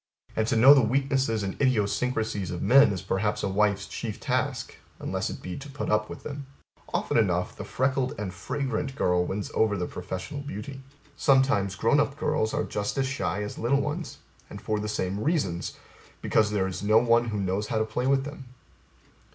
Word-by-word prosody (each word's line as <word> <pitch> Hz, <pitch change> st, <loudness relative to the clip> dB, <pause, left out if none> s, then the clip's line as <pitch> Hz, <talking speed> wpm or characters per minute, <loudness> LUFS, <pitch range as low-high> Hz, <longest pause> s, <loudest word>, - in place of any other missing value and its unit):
And 110 Hz, 0 st, +1 dB
To -, -, +1 dB
know 130 Hz, +5 st, +9 dB
the 140 Hz, -, +5 dB
weaknesses 130 Hz, -2 st, +1 dB
and 95 Hz, -, -2 dB
idiosyncrasies 110 Hz, -4 st, 0 dB
of 90 Hz, -, -4 dB
men 140 Hz, -1 st, +6 dB
is 95 Hz, -2 st, -4 dB
perhaps 100 Hz, +2 st, -1 dB
a -, -, +1 dB
wife's 100 Hz, 0 st, +1 dB
chief -, -, -5 dB
task; -, -, -2 dB, 0.2 s
unless -, -, -2 dB
it -, -, -8 dB
be 90 Hz, -, -5 dB
to 140 Hz, +1 st, -9 dB
put 140 Hz, +1 st, -4 dB
up 105 Hz, 0 st, +1 dB
with -, -, -9 dB
them. 140 Hz, -1 st, -6 dB, 0.4 s
Often -, -, +1 dB
enough -, -, 0 dB
the -, -, -6 dB
freckled 130 Hz, 0 st, 0 dB
and 100 Hz, -3 st, -4 dB
fringrant 135 Hz, +7 st, -3 dB
girl 90 Hz, -8 st, +2 dB
wins 100 Hz, +3 st, -4 dB
over 105 Hz, -2 st, +2 dB
the 90 Hz, -, -1 dB
professional 115 Hz, -, -6 dB
beauty. 135 Hz, +1 st, -7 dB, 0.3 s
Sometimes 130 Hz, -10 st, +3 dB
grown 115 Hz, +8 st, +3 dB
up 140 Hz, 0 st, 0 dB
girls 110 Hz, -7 st, 0 dB
are -, -, 0 dB
just 105 Hz, +5 st, -3 dB
as 135 Hz, -, +2 dB
shy 130 Hz, -6 st, -2 dB
as 105 Hz, -, -6 dB
little 130 Hz, +5 st, +2 dB
ones 150 Hz, +4 st, -3 dB, 0.3 s
and -, -, -8 dB
for 110 Hz, -1 st, -2 dB
the 105 Hz, 0 st, -3 dB
same 100 Hz, -2 st, -2 dB
reasons 100 Hz, -, -1 dB, 0.4 s
because 105 Hz, -1 st, +2 dB
there 105 Hz, -3 st, 0 dB
is 95 Hz, -1 st, -4 dB
no 105 Hz, +2 st, +4 dB
one 115 Hz, 0 st, +4 dB
who 105 Hz, -3 st, -2 dB
knows 100 Hz, +2 st, -1 dB
how -, -, -1 dB
to 110 Hz, -, +2 dB
play 125 Hz, +4 st, -2 dB
with 135 Hz, 0 st, +3 dB
them. 145 Hz, -1 st, -8 dB
110 Hz, 195 wpm, -27 LUFS, 100-135 Hz, 0.4 s, know